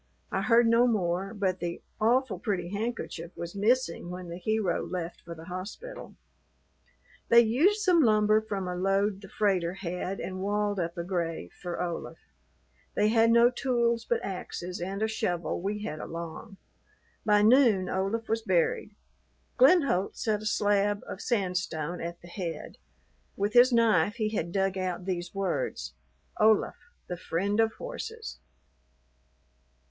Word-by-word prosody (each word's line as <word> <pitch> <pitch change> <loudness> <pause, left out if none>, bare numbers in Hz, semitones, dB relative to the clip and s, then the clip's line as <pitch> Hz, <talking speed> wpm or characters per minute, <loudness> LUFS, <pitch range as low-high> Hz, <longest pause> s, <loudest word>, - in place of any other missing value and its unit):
I - - 0
heard 235 0 +5
no 230 +2 +5
more, 190 -4 0
but 190 -4 -1
the 170 -1 -4 0.2
"awful 230 -2 +2
pretty 180 -4 -2
handkerchief" 200 -5 -4
was 170 0 -6
missing 205 -4 +1
when 180 0 -7
the 170 +1 -6
hero 215 -2 0
left 175 -2 -5
for 170 0 -9
the 160 0 -11
hospital. 185 - -7 1.1
They 235 0 +8
used 305 - +3
some 365 -5 +4
lumber 215 -3 +4
from 200 -4 -4
a 180 - -3
load 195 +2 +1
the 195 - -11
freighter 185 -4 0
had 185 0 -4
and 185 0 -5
walled 205 0 0
up 170 +1 -3
a 170 - -2
grave 170 - -3
for 175 -1 -6
Olaf. 175 -1 -4 0.8
They 210 +1 +3
had 225 0 +4
no 235 +1 +6
tools 235 -2 0
but 235 0 -1
axes 180 -2 -5
and 195 +4 -3
a - - +2
shovel 175 -6 -2
we 205 +2 -3
had 155 -5 -4
along. 170 +6 -7 0.7
By 210 -1 +4
noon 220 -5 +5
Olaf 195 +5 -1
was 225 0 0
buried. 475 - 0 0.6
Glenholdt 270 - +4
set 215 -2 0
a 215 - -3
slab 205 -1 +1
of - - -7
sandstone 180 -6 -2
at 170 +1 -6
the - - -11
head. 175 -2 -6 0.6
With 205 +2 -1
his 245 +1 +7
knife 220 -5 +3
he 215 -2 -1
had 170 -6 -3
dug 195 0 0
out 180 -1 -3
these 175 -1 -4
words 175 - -2 0.5
"Olaf. 215 0 +4 0.3
The 180 - -5
friend 195 +5 -1
of 225 0 +3
horses." 465 -2 -7
200 Hz, 150 wpm, -28 LUFS, 180-225 Hz, 1.1 s, They